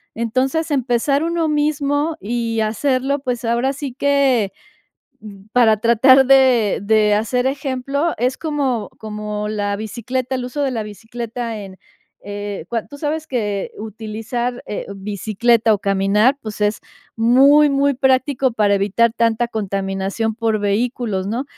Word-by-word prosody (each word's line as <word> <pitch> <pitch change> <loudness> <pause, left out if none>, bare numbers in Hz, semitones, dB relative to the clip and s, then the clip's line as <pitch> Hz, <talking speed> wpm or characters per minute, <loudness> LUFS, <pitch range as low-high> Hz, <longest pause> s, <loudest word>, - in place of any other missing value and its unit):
Entonces, 260 +8 -1
empezar 270 +2 +1
uno 335 -1 0
mismo 295 +1 0
y 230 0 -2
hacerlo, 260 +5 0
pues, 250 -3 -3
ahora 235 +3 +1
sí 275 -2 -6
que, 270 -6 +2 0.7
mm, 200 -2 -12
para 225 -3 +4
tratar 255 +4 +5
de 255 -6 +4
de 210 0 +3
hacer 245 +4 0
ejemplo, 275 +3 -1
es 255 +2 0
como 280 -8 -2
como 210 -1 -5
la 205 -1 -2
bicicleta, 240 +5 -4
el 255 -1 -2
uso 285 +4 -3
de 275 - +1
la 230 -3 -2
bicicleta 230 +2 -6
en, 190 -2 -10 0.4
eh, 205 -2 -6
cua 230 -2 -3
tú 285 - -12
sabes 310 +1 -3
que 210 -8 -2
utilizar, 225 +3 -4
eh, 210 - -5
bicicleta, 215 +3 +1
o, - - -2
caminar, 200 +5 +2
pues, 215 -1 -7
es 210 +1 +1 0.4
muy, 270 +6 +5
muy 280 0 +2
práctico 260 0 +1
para 210 -3 +2
evitar 210 +4 +2
tanta 230 +1 +1
contaminación 195 +1 -2
por 225 -1 0
vehículos, 205 -1 -1
¿no? 235 +6 -2
235 Hz, 140 wpm, -19 LUFS, 210-265 Hz, 0.7 s, tratar